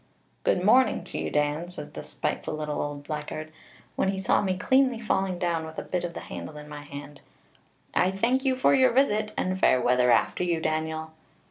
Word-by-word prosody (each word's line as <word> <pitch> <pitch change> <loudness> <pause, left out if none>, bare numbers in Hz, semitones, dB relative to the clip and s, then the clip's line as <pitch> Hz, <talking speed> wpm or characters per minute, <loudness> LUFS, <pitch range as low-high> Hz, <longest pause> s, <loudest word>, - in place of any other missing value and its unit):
'Good 180 - +2
morning 250 +6 +4
to - - -6
you, - - -2
Dan,' 150 +3 0
says 180 - -8
the - - -7
spiteful - - -3
little 150 -1 -3
old 145 -1 -4
blackguard, 155 +1 -5 0.4
when - - +1
he 195 - -1
saw 190 - +2
me 190 -2 0
cleanly 260 +3 +3
falling 195 -4 0
down 170 -2 0
with 160 0 -9
a - - -3
bit 180 -1 -2
of 175 0 -4
the - - -5
handle 150 - -8
in 150 0 -9
my 150 0 -8
hand; 145 0 -10 0.7
'I 180 - +3
thank 230 +8 +1
you 265 -2 +2
for 260 - +3
your 260 -2 +5
visit, 215 -5 +2
and 185 0 -1
fair 130 - +4
weather 125 0 +3
after 150 - +3
you, 170 -2 0
Daniel.' 160 0 -2
175 Hz, 205 wpm, -27 LUFS, 150-200 Hz, 0.7 s, your